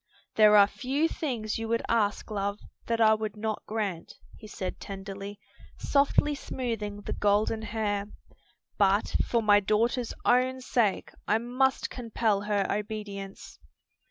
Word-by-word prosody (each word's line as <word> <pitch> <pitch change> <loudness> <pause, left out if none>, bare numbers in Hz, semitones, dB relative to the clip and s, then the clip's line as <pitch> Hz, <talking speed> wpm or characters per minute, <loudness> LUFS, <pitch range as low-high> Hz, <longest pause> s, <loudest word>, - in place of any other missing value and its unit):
"There 210 -1 +6
are 200 - +9
few 275 +8 -1
things 235 -10 -3
you 225 - -3
would 230 +1 0
ask, 215 -1 0
love, 200 0 -2 0.3
that 230 0 0
I 220 -1 +6
would 215 -1 -3
not 215 0 -2
grant," 205 -6 -3 0.2
he 215 - -12
said 185 -3 -5
tenderly, 195 +1 -7 0.4
softly 285 +1 +2
smoothing 225 -7 -4
the - - -4
golden 210 +2 +1
hair; 210 -2 -2 0.7
"but 200 +1 +2
for 235 -1 0
my 205 -1 +6
daughter's 230 +4 0
own 255 +1 +3
sake 230 -5 0 0.2
I 215 - +3
must 255 +3 0
compel 225 -4 0
her 205 -1 0
obedience. 205 -2 -5
215 Hz, 135 wpm, -28 LUFS, 205-235 Hz, 0.7 s, are